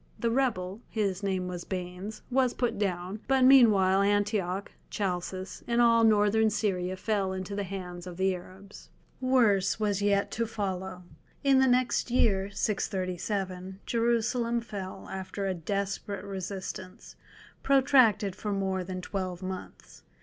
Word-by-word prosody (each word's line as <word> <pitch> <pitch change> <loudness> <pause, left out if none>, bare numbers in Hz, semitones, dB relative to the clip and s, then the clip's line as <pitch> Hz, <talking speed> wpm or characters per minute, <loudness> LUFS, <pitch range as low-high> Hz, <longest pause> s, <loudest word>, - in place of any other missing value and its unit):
The 235 -1 0
rebel—his 210 -4 -1
name 190 -2 -1
was 175 -1 -5
Baanes—was 205 +8 -2
put 245 -4 -1
down, 185 0 -2
but 265 0 +3
meanwhile 210 -8 +6
Antioch, 200 -2 0 0.2
Chalcis, 185 -1 -3
and 235 0 +1
all 230 -1 +5
Northern 220 0 +4
Syria 185 -3 -1
fell 200 -2 -1
into 190 +1 -5
the 205 - -1
hands 180 -2 -7
of 175 -1 -8
the 190 0 +2
Arabs. 185 +3 -11 0.3
Worse 225 -8 +3 0.2
yet 200 -1 +2
was - - -7
to 230 -1 0
follow. 190 -4 -4 0.4
In 275 -1 +5
the 265 - +5
next 250 0 +2
year, 200 -5 +2
637, 190 -1 -2
Jerusalem 235 0 +1
fell, 205 -5 -7
after 190 +1 -4
a 190 - 0
desperate 200 +3 -3
resistance, 190 -1 -6 0.5
protracted 255 -8 +4
for 210 +1 -4
more 190 -1 -1
than 185 0 -5
twelve 185 -1 -4
months. 185 0 -8
200 Hz, 130 wpm, -29 LUFS, 185-225 Hz, 0.5 s, meanwhile